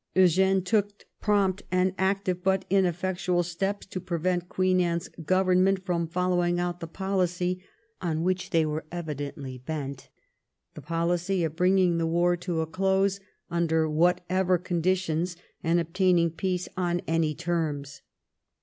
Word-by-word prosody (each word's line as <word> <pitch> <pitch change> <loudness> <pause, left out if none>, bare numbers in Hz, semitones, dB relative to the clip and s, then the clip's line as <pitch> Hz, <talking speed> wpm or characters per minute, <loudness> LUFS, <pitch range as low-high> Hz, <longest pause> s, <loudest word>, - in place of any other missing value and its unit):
Eugene 190 +1 +4
took 205 +1 0 0.2
prompt 200 -3 +2
and 185 0 +2
active 190 -2 0
but 190 0 +1
ineffectual 180 -1 +1
steps 195 +4 -3
to 185 - -5
prevent 175 0 -1
Queen 185 -1 +2
Anne's 170 -1 -1
Government 185 +2 +2
from 170 -3 0
following 175 0 +1
out 175 0 -2
the 165 - -6
policy 180 0 -1 0.4
on 165 -3 -1
which 185 +1 -1
they 165 -2 +3
were 155 +1 -2
evidently 145 -5 -5
bent 140 -1 -5 0.3
— - - -56
the 155 - -9
policy 170 +4 0
of 160 -1 -2
bring 180 +2 +3
ing 175 -3 +3
the 165 - +1
war 175 +2 +2
to 175 -1 -2
a - - 0
close 190 +3 +1 0.3
under 160 -2 +2
whatever 180 +3 +2
conditions, 175 -1 -1 0.3
and 165 +1 +3
obtaining 170 0 +2
peace 180 +1 -2
on 175 -1 0
any 160 -2 +1
terms. 155 -4 -3
175 Hz, 140 wpm, -27 LUFS, 165-185 Hz, 0.4 s, Eugene